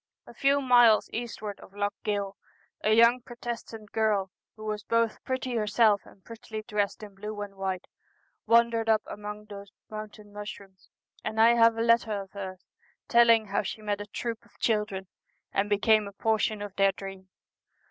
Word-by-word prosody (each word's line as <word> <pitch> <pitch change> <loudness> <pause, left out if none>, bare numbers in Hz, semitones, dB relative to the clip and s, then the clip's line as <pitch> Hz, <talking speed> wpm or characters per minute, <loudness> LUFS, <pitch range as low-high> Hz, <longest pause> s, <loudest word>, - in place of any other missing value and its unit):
A - - -13
few 280 +1 +2
miles 240 -4 +5
eastward 220 -3 -5
of 195 - -15
Lough 205 0 -1
Gill, 200 -2 -2 0.5
a 215 - +3
young 235 +3 +6
Protestant 235 -3 -7
girl, 210 -4 +1 0.2
who 215 -1 -10
was 210 -1 -2
both 230 +1 0
pretty 260 -1 -2
herself 210 -1 +3
and 190 - -19
prettily 220 -1 -7
dressed 210 0 -1
in 205 -1 -9
blue 210 +2 -7
and 205 -1 -6
white, 190 -1 -3 0.6
wandered 230 -1 +4
up 220 -1 +4
among 210 0 -7
those 200 -1 -10 0.2
mountain 215 -1 -8
mushrooms, 200 -2 -9 0.3
and 220 - -3
I 225 +1 +8
have 230 -1 +5
a 225 - +1
letter 230 -3 +3
of 195 -1 -9
hers 190 -2 -7 0.4
telling 230 -2 +6
how 200 - +1
she 215 +2 -6
met 205 -1 -1
a 205 - -7
troop 230 +2 -4
of - - -25
children, 210 -4 0 0.5
and 205 +1 +1
became 210 +1 +3
a 200 - -9
portion 215 0 0
of 200 -1 -8
their 195 0 +4
dream. 195 -1 -9
215 Hz, 170 wpm, -28 LUFS, 200-230 Hz, 0.6 s, I